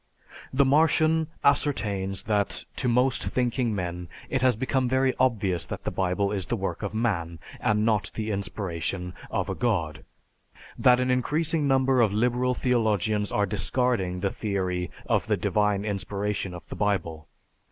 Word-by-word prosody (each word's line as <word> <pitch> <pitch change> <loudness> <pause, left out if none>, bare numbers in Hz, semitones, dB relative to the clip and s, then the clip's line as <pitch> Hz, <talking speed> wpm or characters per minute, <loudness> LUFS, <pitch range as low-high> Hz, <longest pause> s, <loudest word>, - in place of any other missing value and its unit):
_") - - -21 0.2
The 135 +1 +3
Martian 155 +2 +3 0.2
ascertains 100 -10 +1
that 105 -2 0
to 130 - -1
most 125 +2 +2
thinking 120 -2 0
men 90 -2 -4 0.2
it 135 - +1
has 130 -2 +4
become 130 +2 0
very 130 0 +2
obvious 100 - +1
that - - -6
the - - -2
Bible 95 +2 0
is 95 -3 -3
the 120 - 0
work 100 -3 -3
of 105 0 -4
man, 85 -8 -1 0.2
and 105 +1 +1
not 110 -2 +1
the 110 0 -2
inspiration 90 -3 -3 0.2
of - - -1
a - - -2
god; 85 -11 -1 0.7
that 125 0 +5
an 125 0 +1
increasing 150 +4 +1
number 135 -1 +3
of 110 -4 +3
liberal 125 +4 +1
theologians 110 -4 +1
are 105 - +2
discarding 105 -3 0
the 100 -1 0
theory 95 -4 -2 0.2
of - - +1
the - - +2
divine 105 -1 +1
inspiration 100 -2 -2
of 90 - -11
the - - -5
Bible. 85 -7 -1
105 Hz, 160 wpm, -26 LUFS, 95-125 Hz, 0.7 s, that